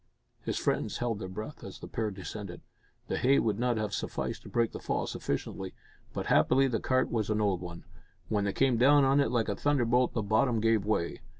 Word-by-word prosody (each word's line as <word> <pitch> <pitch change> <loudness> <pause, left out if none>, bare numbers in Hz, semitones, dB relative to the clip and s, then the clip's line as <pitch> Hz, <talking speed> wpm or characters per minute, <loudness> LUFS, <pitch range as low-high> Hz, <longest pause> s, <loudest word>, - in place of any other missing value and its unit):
His - - -3
friends - - 0
held 115 -4 -2
their 95 - -5
breath 110 +10 -7
as 95 - -8
the - - -9
pair 110 -2 -2
descended. 100 -1 -7 0.5
The - - -1
hay 135 +2 +4
would 110 -2 +1
not 120 -1 +1
have 105 -2 -2
sufficed - - -3
to - - -11
break 115 -1 +1
the - - -7
fall - - -1
sufficiently, 95 -1 -4 0.4
but - - -4
happily 135 +1 +4
the 115 -4 -1
cart 130 0 +1
was 110 -3 -1
an 110 0 +1
old 100 -4 +1
one. 85 -1 -8 0.4
When 105 -2 0
they 100 - 0
came 130 -3 +2
down 140 +4 +6
on 135 +1 +4
it 140 - +3
like 120 -3 +1
a 100 - -1
thunderbolt, 125 -2 +2
the 110 - 0
bottom 110 +3 +2
gave 110 -2 +2
way. 105 -5 -1
110 Hz, 215 wpm, -30 LUFS, 100-125 Hz, 0.5 s, down